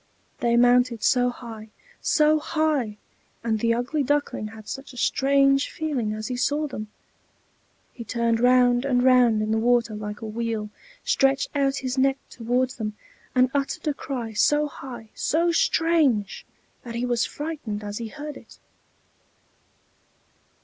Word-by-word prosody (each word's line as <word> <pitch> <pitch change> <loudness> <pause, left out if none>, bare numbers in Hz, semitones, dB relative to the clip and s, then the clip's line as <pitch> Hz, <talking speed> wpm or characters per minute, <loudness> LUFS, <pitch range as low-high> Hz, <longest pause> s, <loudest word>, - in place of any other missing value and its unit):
They 235 0 +2
mounted 245 -2 +4
so 245 +1 +3
high, 225 -3 -9 0.3
so 305 0 +3
high! 300 -9 -1 0.5
and 220 -2 0
the 230 +1 +2
ugly 250 +6 -1
Duckling 285 -5 -1
had 215 0 -12
such 270 0 -7
a - - -13
strange 275 +2 +3
feeling 275 -9 -2
as 215 0 -4
he 250 - -3
saw 290 +4 0
them! 215 -7 -6 1.1
He 235 - -8
turned 230 -1 0
round 245 0 +4
and 250 -3 +1
round 245 -4 +5
in 215 - -2
the 220 - +2
water 235 -1 +2
like 210 +1 -6
a - - -5
wheel, 220 -1 -3 0.3
stretched 270 0 +2
out 275 -1 +2
his 255 +1 -1
neck 270 0 +3
towards 250 +2 -1
them, 215 -2 -4 0.4
and 255 0 +4
uttered 280 +2 -2
a 300 - +2
cry, 245 -5 -5
so 295 +7 +3
high, 240 -6 -10
so 335 +2 +1
strange, 310 - +1 0.3
that 235 -1 -8
he 240 +1 -1
was 240 -2 +1
frightened 290 -9 -5
as 205 +1 -5
he 230 - -4
heard 295 +5 -8
it. - - -16
245 Hz, 150 wpm, -24 LUFS, 225-275 Hz, 1.1 s, round